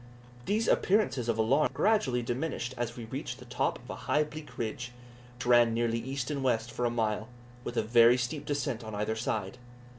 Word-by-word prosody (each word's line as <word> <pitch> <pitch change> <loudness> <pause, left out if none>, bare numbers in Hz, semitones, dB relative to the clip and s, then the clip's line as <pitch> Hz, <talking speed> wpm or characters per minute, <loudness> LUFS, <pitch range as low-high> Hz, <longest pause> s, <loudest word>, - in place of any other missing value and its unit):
These 215 +2 +1
appearances 130 - +2
of 115 - +1
alarm 130 +7 +3
gradually 140 - +2
diminished 125 +1 -2
as 120 -1 -3
we 120 - -6
reached - - -5
the - - -12
top - - -1
of - - -16
a - - -5
high 150 - +4
bleak 150 0 -10
ridge, 120 +1 -4 0.4
which 125 - -6
ran 120 -2 +5
nearly 115 0 +1
east 130 +3 -3
and 140 -2 -2
west 120 -2 +1
for 125 - -2
about 120 - +1
a - - -6
mile, 110 -1 0 0.4
with 120 - -5
a - - +3
very 115 +2 +6
steep 125 +4 -2
descent 140 -5 -2
on 110 -1 -6
either 105 +2 -1
side. 110 -1 -3
120 Hz, 205 wpm, -30 LUFS, 115-140 Hz, 0.4 s, very